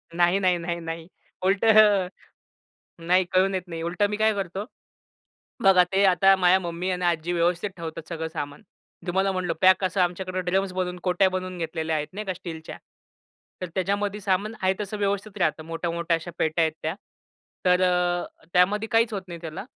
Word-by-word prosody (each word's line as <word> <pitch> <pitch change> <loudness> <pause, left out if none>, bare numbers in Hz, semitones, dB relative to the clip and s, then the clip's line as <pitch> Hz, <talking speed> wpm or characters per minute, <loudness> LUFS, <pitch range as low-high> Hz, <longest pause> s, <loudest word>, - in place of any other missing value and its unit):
नाही, 175 +2 +3
नाही, 180 -2 +2
नाही, 170 0 -3
नाही. 165 0 -6 0.4
उलट 195 +3 +2 1.4
नाही 180 +2 +3
कळून 190 +1 +3
येत 185 - -1
नाही. 165 -1 -5
उलट 175 +4 -3
मी 210 - -2
काय 220 0 +3
करतो? 195 +1 -4 1.0
बघा 185 -2 +7
ते 195 +1 +3
आता 195 +1 +5
माझ्या 185 0 +4
मम्मी 175 +1 -4
आणि 180 0 -2
आजी 170 0 0
व्यवस्थित 175 +3 +1
ठेवतात 165 -1 -7
सगळं 160 -1 -3
सामान. 145 -3 -5 0.5
तुम्हाला 190 +2 +1
म्हटलं 180 -3 -1
पॅक 185 +1 +5
असं 185 0 +1
आमच्याकडे 185 +1 -1
ड्रम्स 195 0 +1
बनवून, 180 -1 -2
कोट्या 185 +1 +3
बनवून 185 -1 -4
घेतलेल्या 160 -1 -2
आहेत 150 0 -2
नाही 215 +2 -5
का 190 - -2
स्टीलच्या. 165 -3 -8 0.8
तर 180 - -3
त्याच्यामध्ये 200 +2 -1
सामान 200 +2 0
आहे 190 0 +3
तसं 210 +1 -4
व्यवस्थित 200 +1 -2
राहतं. 155 -2 0
मोठ्या, 165 +1 -3
मोठ्या 170 0 0
अश्या 165 +1 -9
पेट्या 160 +1 +1
आहेत 160 -1 0
त्या. 160 +4 -2 0.7
तर 180 0 +4
अ, 180 -2 0
त्यामध्ये 205 +5 +3
काहीच 225 0 +3
होत 195 - -2
नाही 170 -1 -8
त्याला. 165 +6 -6
180 Hz, 175 wpm, -25 LUFS, 170-195 Hz, 1.4 s, बघा